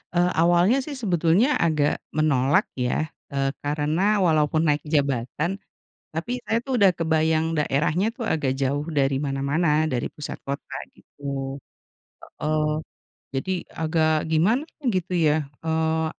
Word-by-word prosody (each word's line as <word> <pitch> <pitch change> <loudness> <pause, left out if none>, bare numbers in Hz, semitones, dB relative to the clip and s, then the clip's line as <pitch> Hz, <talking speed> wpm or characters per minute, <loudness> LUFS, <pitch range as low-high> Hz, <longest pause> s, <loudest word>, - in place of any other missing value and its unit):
eee, 175 +1 +3
awalnya 175 +8 +4
sih 290 +1 -6
sebetulnya 195 - +2
agak 155 -3 +2 0.2
menolak 145 -3 +3 0.2
ya, 125 +5 0 0.2
eee, 135 -1 0
karena 155 +8 +1
walaupun 155 -2 +2
naik 150 0 +1
jabatan 145 +4 0 0.6
tapi 245 +10 -2
saya 225 - +2
tuh 255 -4 -1
udah 195 - +7
kebayang 160 0 +1
daerahnya 150 +7 +1
tuh 245 - -4
agak 140 -9 0
jauh 140 +2 -1
dari 140 -3 +1
mana-mana, 150 +3 +1
dari 120 - -1
pusat 150 - -7
kota 140 +1 -5 0.2
gitu - - -23 1.1
heeh. 155 0 0 0.7
Jadi 135 +8 -2 0.3
agak 160 0 +2 0.2
gimana 200 - +3 0.3
gitu 185 0 -2
ya, 150 - +4 0.3
eee, 160 0 +1
155 Hz, 125 wpm, -24 LUFS, 145-175 Hz, 1.1 s, udah